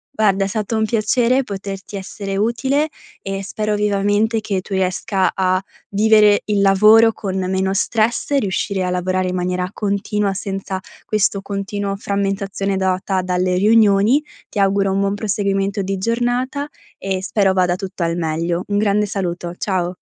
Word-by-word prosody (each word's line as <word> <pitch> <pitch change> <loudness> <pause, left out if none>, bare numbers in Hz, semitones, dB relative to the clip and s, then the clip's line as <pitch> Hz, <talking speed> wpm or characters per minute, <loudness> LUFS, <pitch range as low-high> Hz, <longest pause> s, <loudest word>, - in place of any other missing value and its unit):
Guarda, 200 -4 +2
è - - 0
stato 215 +2 -2
un 220 0 +2
piacere 235 +4 +2
poterti 195 -2 -7
essere 195 0 -5
utile 265 +8 +1 0.3
e 195 0 -4
spero 210 +2 -2
vivamente 210 +2 +1
che 200 -3 -2
tu 190 +2 -8
riesca 190 +1 0
a 185 -1 +1 0.3
vivere 210 0 +4
il 210 -1 0
lavoro 215 +3 +6
con 190 -4 -4
meno 190 0 0
stress 220 +6 0
e 285 - +4
riuscire 195 -2 -1
a 180 - -1
lavorare 185 +1 0
in 180 - -3
maniera 180 0 -1
continua, 205 0 -1
senza 195 -1 -4 0.3
questo 205 -2 +1
continuo 200 0 -3
frammentazione 195 0 -2
data 190 0 0
dalle 180 0 0
riunioni. 210 +5 +4 0.3
Ti 210 - -4
auguro 195 0 +2
un 195 - 0
buon 200 0 +1
proseguimento 200 -1 -1
di 195 +1 -2
giornata 245 +6 -1 0.3
e 190 -1 -3
spero 195 -1 +2
vada 180 -1 +2
tutto 190 0 -5
al 165 0 -1
meglio. 170 +2 -1
Un 205 - 0
grande 210 0 +2
saluto, 175 -3 -3
ciao! 185 -2 -1
195 Hz, 155 wpm, -19 LUFS, 190-210 Hz, 0.3 s, lavoro